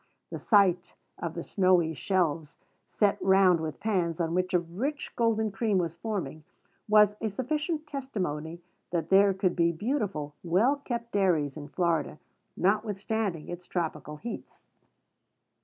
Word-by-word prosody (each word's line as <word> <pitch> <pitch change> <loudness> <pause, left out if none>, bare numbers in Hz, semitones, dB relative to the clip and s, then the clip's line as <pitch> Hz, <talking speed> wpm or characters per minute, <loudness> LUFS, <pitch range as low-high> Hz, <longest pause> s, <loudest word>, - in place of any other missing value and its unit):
The - - -5
sight 190 -5 +3 0.2
of - - -4
the - - -4
snowy 185 -5 +2
shelves 160 0 -1 0.3
set 205 -2 +1
round 190 -2 +5
with 155 -2 -5
pans, 180 -6 0
on 165 -1 0
which 185 +1 0
a 180 - +4
rich 225 - -4
golden 220 -2 +1
cream 210 0 0
was 170 -2 -1
forming, 170 -7 -4 0.5
was 210 -1 +6
a 220 - 0
sufficient 300 - -2
testimony 180 - -4 0.3
that 170 -2 -2
there 195 +1 +6
could 185 -2 0
be 170 -1 +3
beautiful, 190 - -2
well 205 +12 +2
kept 235 -4 -5
dairies 170 -8 +1
in 145 -2 -8
Florida, 165 -1 -1 0.4
notwithstanding 205 -2 -1
its 175 0 -8
tropical 155 -4 -3
heats. 235 +9 -8
185 Hz, 140 wpm, -28 LUFS, 165-215 Hz, 0.5 s, was